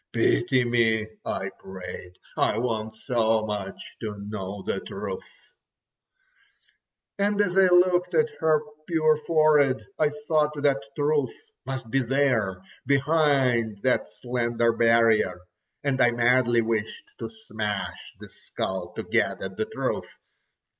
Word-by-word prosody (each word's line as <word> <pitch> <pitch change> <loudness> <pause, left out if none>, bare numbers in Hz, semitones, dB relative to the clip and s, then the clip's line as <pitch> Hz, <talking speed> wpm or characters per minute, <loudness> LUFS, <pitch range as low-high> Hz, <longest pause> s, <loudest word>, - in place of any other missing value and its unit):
"Pity 125 - +2
me," 115 -2 +2 0.2
I - - -3
prayed, 90 -1 -9 0.2
"I - - +1
want 110 -2 -2
so 110 -2 +1
much 105 -2 -6
to 110 -2 -4
know 100 -1 -6
the - - -2
truth." 475 0 -6 2.0
And 205 +1 +1
as 185 -3 +2
I 195 -1 +6
looked 180 0 +3
at 465 -1 +3
her 155 -1 +3 0.3
pure 155 -2 +3
forehead, 150 -4 +3
I 155 - +4 0.2
thought 150 -2 +1
that 140 -6 +3
truth 145 -3 0 0.3
must 130 -4 -5
be 135 - +2
there 120 -8 +1 0.2
behind 135 -7 +2
that 130 -1 +1
slender 120 -1 0
barrier. 115 -4 +3 0.4
And 135 -2 0
I 120 - +6
madly 120 0 +3
wished 110 -1 -2
to - - -5
smash 110 - -5
the - - -10
skull 95 -2 -5
to - - -5
get - - 0
at - - -6
the - - -1
truth. - - -3
120 Hz, 125 wpm, -26 LUFS, 110-150 Hz, 2.0 s, I